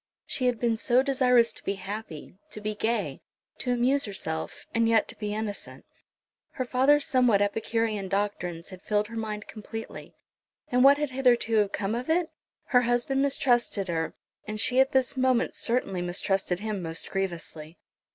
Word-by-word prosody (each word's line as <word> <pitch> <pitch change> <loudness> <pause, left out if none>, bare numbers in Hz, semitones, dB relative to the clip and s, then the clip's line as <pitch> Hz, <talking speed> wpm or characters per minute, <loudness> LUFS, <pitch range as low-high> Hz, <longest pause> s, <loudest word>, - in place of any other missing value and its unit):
She 255 - 0
had 245 -2 0
been 230 -2 +1
so 245 +3 +3
desirous 250 -4 +3
to - - -12
be 195 - -1
happy, 195 -4 -7
to - - -6
be 215 0 -3
gay, 225 +3 -2 0.4
to 250 - -1
amuse 255 +3 +2
herself, 160 -6 -5
and 230 0 +2
yet 225 -2 +3
to - - -6
be 210 -2 -3
innocent. 215 -2 -6 0.7
Her 255 - -3
father's 270 +4 +3
somewhat 250 -8 +3
epicurean 215 0 -1
doctrines 195 -4 -2
had 185 -1 -10
filled 210 0 0
her 230 - -8
mind 215 -2 -4
completely. 225 +1 -8 0.6
And 250 0 +4
what 280 +1 +7
had 295 -2 -2
hitherto 240 -5 +3
come 195 +1 -2
of 245 +5 -3
it? 330 0 +1 0.4
Her 250 -2 +5
husband 245 +3 +1
mistrusted 240 -8 +1
her; 165 -1 -2 0.3
and 215 0 -4
she 255 +3 +3
at 265 +1 +4
this 265 -1 +1
moment 255 -2 +2
certainly 215 -7 -1
mistrusted 180 +1 -1
him 215 -3 -3
most 165 -1 -5
grievously. 170 -4 -4
225 Hz, 165 wpm, -27 LUFS, 200-250 Hz, 0.7 s, what